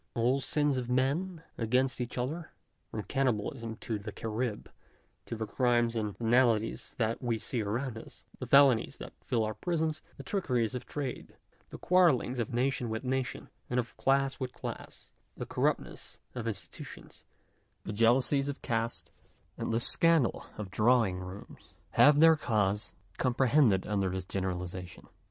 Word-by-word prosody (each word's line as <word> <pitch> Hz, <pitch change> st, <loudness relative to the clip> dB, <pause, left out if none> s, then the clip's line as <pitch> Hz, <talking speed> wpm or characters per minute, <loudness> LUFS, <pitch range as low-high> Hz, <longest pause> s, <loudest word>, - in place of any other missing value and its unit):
All 125 Hz, +4 st, +2 dB
sins 145 Hz, -1 st, +1 dB
of 125 Hz, -1 st, -3 dB
men 155 Hz, +8 st, 0 dB, 0.2 s
against 125 Hz, +3 st, +1 dB
each 125 Hz, +1 st, -4 dB
other, 155 Hz, +7 st, -3 dB, 0.4 s
from 110 Hz, -, -4 dB
the -, -, -13 dB
cannibalism 115 Hz, -2 st, -1 dB
of 110 Hz, -2 st, -4 dB
the 105 Hz, -, -5 dB
Carrib 110 Hz, +2 st, -3 dB, 0.6 s
to -, -, -4 dB
the 110 Hz, 0 st, -3 dB
crimes 120 Hz, +1 st, +2 dB
and 105 Hz, -3 st, -2 dB
venalities 115 Hz, -1 st, +2 dB
that 115 Hz, -1 st, -1 dB
we 120 Hz, -2 st, 0 dB
see 115 Hz, +2 st, -2 dB
around 115 Hz, +3 st, -2 dB
us; -, -, -11 dB
the -, -, -5 dB
felonies 140 Hz, -4 st, +5 dB
that -, -, -9 dB
fill 115 Hz, -2 st, 0 dB
our 110 Hz, 0 st, -1 dB
prisons, 160 Hz, -, -1 dB, 0.2 s
the 140 Hz, -, -8 dB
trickeries 125 Hz, -, 0 dB
of 125 Hz, -, -5 dB
trade, 140 Hz, -4 st, -5 dB, 0.3 s
the -, -, -8 dB
quarrelings 160 Hz, -9 st, +3 dB
of 115 Hz, -, -2 dB
nation 125 Hz, 0 st, 0 dB
with 110 Hz, +2 st, -3 dB
nation, 130 Hz, 0 st, -2 dB, 0.2 s
and 125 Hz, -, +1 dB
of 120 Hz, -1 st, -4 dB
class 135 Hz, 0 st, +1 dB
with 130 Hz, -2 st, -4 dB
class, -, -, -8 dB, 0.3 s
the -, -, -4 dB
corruptness -, -, -2 dB, 0.2 s
of 120 Hz, -2 st, -4 dB
institutions, 105 Hz, -4 st, -8 dB, 0.6 s
the -, -, -5 dB
jealousies 130 Hz, +6 st, +3 dB
of 140 Hz, -, -6 dB
caste, 115 Hz, -1 st, -2 dB, 0.4 s
and -, -, -3 dB
the 115 Hz, -, +2 dB
scandal 165 Hz, +1 st, +3 dB
of 105 Hz, -3 st, -6 dB
drawing 110 Hz, -3 st, +3 dB
rooms, 95 Hz, +2 st, -10 dB, 0.2 s
have 145 Hz, 0 st, +6 dB
their 165 Hz, 0 st, +8 dB
causes 105 Hz, -7 st, 0 dB, 0.2 s
comprehended 125 Hz, -5 st, +3 dB
under 100 Hz, -2 st, 0 dB
this 95 Hz, 0 st, -4 dB
generaliza 90 Hz, -1 st, -3 dB
tion. 90 Hz, -, -15 dB
120 Hz, 155 wpm, -31 LUFS, 110-135 Hz, 0.6 s, their